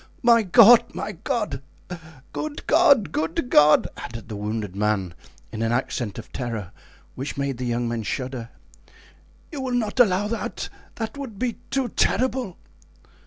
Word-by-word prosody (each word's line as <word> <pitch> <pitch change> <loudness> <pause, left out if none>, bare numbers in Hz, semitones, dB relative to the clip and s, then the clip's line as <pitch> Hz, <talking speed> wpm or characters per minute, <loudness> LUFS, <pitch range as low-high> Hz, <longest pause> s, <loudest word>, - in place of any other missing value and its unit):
My 235 -1 +6
God! 225 +3 +6
my - - -3
God! 200 - -3 0.7
Good 305 -1 -5
God! 280 - +4
good 160 +10 -2
God!" 150 0 +6
added 115 -1 -8
the 110 - -5
wounded 105 -1 -4
man, 100 -4 0 0.4
in 110 - -5
an 115 0 0
accent 120 -3 -2
of 115 - -9
terror 115 -7 -4 0.4
which 135 +2 -6
made 140 -3 -2
the 125 - -2
young 120 0 -1
men 115 -1 -2
shudder; 125 +1 -4 1.0
"you 290 -4 -5
will 255 -2 -2
not 225 -1 -1
allow 205 -3 +4
that? 230 +2 -4 0.3
that 225 +4 -5
would 245 -7 -7
be 240 +1 -2
too 270 -3 -1
terrible!" 255 -5 0
155 Hz, 150 wpm, -24 LUFS, -, 1.0 s, My